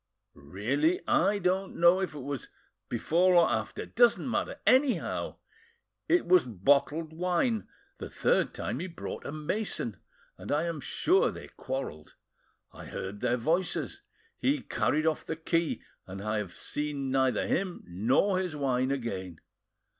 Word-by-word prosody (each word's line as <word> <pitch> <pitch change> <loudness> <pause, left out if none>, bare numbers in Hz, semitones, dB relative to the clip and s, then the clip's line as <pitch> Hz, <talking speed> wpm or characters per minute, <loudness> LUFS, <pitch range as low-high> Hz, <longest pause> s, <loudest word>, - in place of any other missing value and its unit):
"Really, 120 - 0
I 205 - +3
don't 190 0 0
know 175 +2 +6
if 185 -5 -3
it 145 - -6
was 140 -1 -5 0.4
before 175 +10 +3
or 170 -1 +6
after—doesn't 225 - +1
matter. 275 +3 -2
Anyhow, 260 0 +2 0.7
it 350 0 +4
was 180 -1 +5
bottled 140 - +1
wine. 180 +7 0 0.3
The - - -6
third - - +1
time - - -3
he 185 - -3
brought 170 -2 -7
a - - -4
mason, 155 - -2 0.4
and 95 - -6
I 150 +2 +2
am 165 -3 -3
sure 390 - +2
they - - -9
quarreled. 130 - -6 0.6
I - - -11
heard 95 +2 -6
their 120 - +1
voices. 165 +8 -1 0.4
He 275 +1 +1
carried 155 +1 0
off 160 -1 +1
the 160 - -4
key, 165 +1 -1 0.2
and 95 +1 -7
I 105 0 0
have 95 -4 -6
seen 145 -3 -2
neither 130 -4 +2
him 185 -1 -1
nor 125 - +2
his 180 -4 -3
wine 130 -3 0
again. 95 -10 -4
155 Hz, 145 wpm, -29 LUFS, 125-185 Hz, 0.7 s, know